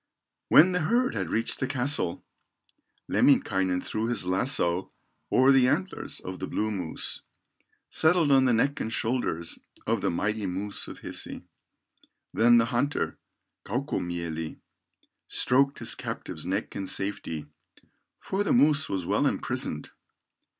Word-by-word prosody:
When 175 +4 +7
the 180 - 0
herd 240 +10 +1
had - - -3
reached 115 - -1
the 130 - -1
castle, 130 -9 0 0.8
Lemminkainen 95 -1 +2
threw 110 +1 -2
his 120 -6 +2
lasso 95 -2 +1 0.4
O'er 130 +2 +5
the 130 -2 +5
antlers 95 -7 -2
of 95 0 -7
the 95 - -4
blue 110 0 -1
moose, 90 -6 -3 0.7
Settled 160 -2 +3
on 135 -1 +5
the 125 - +3
neck 140 +5 +1
and 110 - -3
shoulders 110 -9 -2 0.3
Of - - 0
the - - +1
mighty 105 +4 -1
moose 100 +3 -4
of - - -10
Hisi. - - -3 0.9
Then 120 +2 +5
the 115 - +4
hunter, 140 +5 -1 0.4
Kaukomieli, 85 - -3 0.7
Stroked 140 +2 +3
his - - +2
captive's 80 +2 -6
neck 100 +4 -2
in 95 - -4
safety, 95 -5 -3 0.7
For 195 +2 -2
the - - -1
moose 150 +4 +3
was 95 -3 -2
well - - +2
imprisoned. - - -3
110 Hz, 135 wpm, -27 LUFS, 95-135 Hz, 0.9 s, When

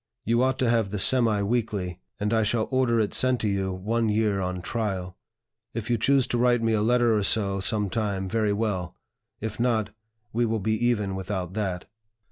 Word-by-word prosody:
You 115 +2 +2
ought 130 0 +1
to 130 - +1
have 115 -3 +2
the 105 - -4
Semi 110 -1 +3
weekly, 100 -5 -2 0.2
and 105 +2 -1
I 110 - +3
shall 110 +1 0
order 130 -3 +2
it 105 - 0
sent 130 -1 +2
to 110 - 0
you 95 -1 -1
one 110 +5 -1
year 105 -2 +1
on 90 -1 -3
trial; 95 -5 -3 0.6
if 115 +1 -3
you 120 - +1
choose 135 +2 +3
to 120 - 0
write 120 -1 +3
me 115 0 +2
a 105 - +1
letter 120 0 +3
or 105 - +1
so 100 -1 +2
some 105 +1 +1
time, 100 -2 -2
very 110 +1 0
well; 100 -4 -2 0.5
if 110 +1 -5
not, 110 -3 +1 0.4
we 120 +2 +1
will 110 -1 0
be 110 +3 0
even 105 -5 0
without 95 -1 -4
that. 95 -4 -3
110 Hz, 200 wpm, -26 LUFS, 100-115 Hz, 0.6 s, Semi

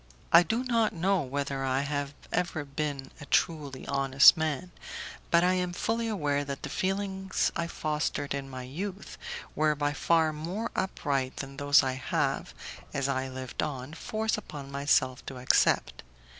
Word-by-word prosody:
I 170 - +10
do 225 +9 0
not 230 -4 +2
know 185 +2 +2
whether 140 0 -2
I 135 0 +1
have 145 0 -3 0.2
ever 170 -4 -1
been 140 -1 -4
a - - -7
truly 145 -5 0
honest 135 +1 +6
man, 160 +2 -2 0.6
but 170 0 +5
I 180 +1 +4
am 180 -1 -1
fully 230 +5 -1
aware 145 -9 0
that 140 -1 -6
the - - -4
feelings 190 0 -1
I 170 0 -1
fostered 150 -3 -2
in 140 -1 -4
my 130 -1 -6
youth 185 +9 -6 0.4
were 155 0 +3
by 145 0 0
far 160 0 +2
more 175 +9 -4
upright 140 -8 -1
than 135 0 -6
those 145 +1 +5
I 130 - 0
have, 130 -2 -1 0.4
as 140 -1 0
I 135 -1 -1
lived 130 -1 -5
on, 135 0 -4
forced 220 +5 -1
myself 140 -2 0
to 135 - -6
accept. 125 - +2
145 Hz, 155 wpm, -29 LUFS, 135-180 Hz, 0.6 s, I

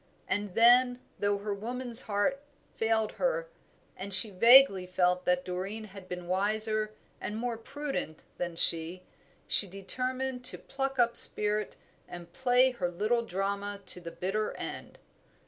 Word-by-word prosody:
And 200 0 -4
then, 245 +2 +3 0.2
though 205 0 -1
her 205 +1 -5
woman's 240 +3 0
heart 220 +7 -2 0.3
failed 225 -1 -1
her, - - -3 0.5
and 195 +2 -9
she 205 +2 +5
vaguely 215 -2 +5
felt 180 0 -1
that 180 0 -1
Doreen 190 +4 -6
had 195 -3 -14
been 180 -1 -7
wiser 215 +3 -2 0.2
and 210 - -6
more 240 0 -4
prudent 250 - -7 0.2
than 175 -1 -5
she, 170 +2 0 0.4
she 200 - +1
determined 255 +7 -4
to - - -1
pluck 270 0 -6
up 235 -1 +1
spirit 210 0 +8 0.3
and 175 -1 -12
play 255 0 +1
her 185 -8 -4
little 215 +7 -2
drama 200 0 -5
to 180 - -5
the 170 - -8
bitter 195 +5 -4
end. - - -9
210 Hz, 145 wpm, -28 LUFS, 185-245 Hz, 0.5 s, spirit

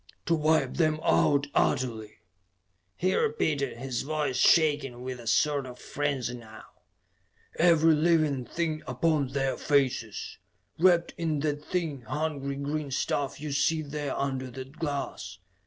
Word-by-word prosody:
"To 170 - +2
wipe 155 -4 +2
them 155 -2 +2
out 80 - +3
utterly!" 110 -8 -1 0.7
he 185 +2 0
repeated, 155 - 0
his 125 -1 -3
voice 150 -2 -2
shaking 135 -4 +3
with 130 -1 -5
a 115 - -10
sort 140 +3 +2
of 125 -1 -10
frenzy 140 -4 -2
now. 115 -3 -11 1.0
"Every 165 -1 +5
living 155 -4 +2
thing 160 0 -2
upon 145 +2 +1
their 135 0 -1
faces, 130 -7 0 0.4
wrapped 175 -1 +4
in 155 -3 -1
that 150 -1 -2
thin, 160 -7 -2
hungry 140 +2 -3
green 145 +1 -3
stuff 135 +1 -1
you 150 0 -5
see 145 +3 +1
there 145 -1 -4
under 130 -2 -2
that 130 +4 -10
glass. 140 - -4
145 Hz, 135 wpm, -28 LUFS, 130-155 Hz, 1.0 s, Every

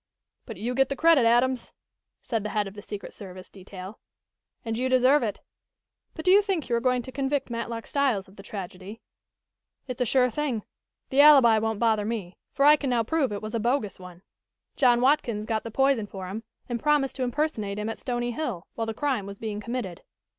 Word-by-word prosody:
"But - - -7
you 240 +3 -2
get 270 +1 +2
the 275 - -2
credit, 320 -4 +5
Adams," 245 +1 +2 0.5
said 225 -3 -1
the 210 - -4
head 210 -1 -1
of 195 - -9
the 205 - -9
secret 205 0 -8
service 185 -3 -10
detail. 190 +1 -10 0.7
"And 225 -1 -2
you 255 +3 -1
deserve 260 +3 +4
it. 215 -4 -3 0.7
But 315 - -7
do 365 - +5
you 400 +2 +7
think 390 -7 -2
you 235 - +1
are - - +2
going 250 0 +1
to 260 - -9
convict 270 -1 -2
Matlock 230 -1 -4
Styles 260 -9 0
of 190 - -18
the 195 - -11
tragedy?" 195 +1 -8 0.9
"It's 250 -1 -5
a - - +3
sure 250 +1 +3
thing. 255 -5 -2 0.5
The 270 +2 +6
alibi 270 -7 +7
won't 220 0 -1
bother 220 -2 +2
me, 205 -5 -4 0.2
for 275 +1 +2
I 300 +1 +8
can 280 - -3
now 240 -2 +2
prove 275 +1 0
it 205 +1 -5
was 215 - -5
a 230 - 0
bogus 235 -3 -1
one. 180 0 -12 0.5
John 245 -3 +4
Watkins 245 -6 +2
got 220 -1 -1
the 230 - -6
poison 270 -2 +2
for 190 -2 -7
him, 220 +4 -6 0.2
and 240 -2 -3
promised 295 -3 +2
to 260 - -1
impersonate 245 -6 -2
him 210 +1 -3
at 225 - -4
Stony 240 -1 -2
Hill, 235 - -4
while 225 -1 -3
the 225 - -3
crime 260 -8 -1
was 200 0 -8
being 215 -1 -4
committed. 230 -6 -5
235 Hz, 210 wpm, -26 LUFS, 210-265 Hz, 0.9 s, I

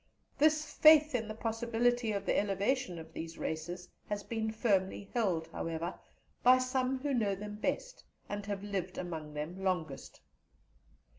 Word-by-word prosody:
This 310 0 +3
faith 310 -1 +7
in 225 -3 0
the 215 - -5
possibility 230 +1 +1
of 200 -1 -2
the - - +2
elevation 205 +1 0
of 160 0 -10
these 165 0 -6
races 175 +3 -4 0.2
has 205 -1 -2
been 220 -1 -2
firmly 200 -3 0
held, 185 -9 +1
however, 165 0 -3 0.5
by 255 +1 +7
some 255 +1 0
who 280 +2 -2
know 210 -5 +1
them 210 +1 -7
best, - - -2 0.2
and 205 0 -4
have 200 -1 -3
lived 190 -3 -3
among 160 -4 -5
them 155 +5 -4
the - - -8
longest. 175 -7 -2
205 Hz, 155 wpm, -33 LUFS, 180-245 Hz, 0.5 s, faith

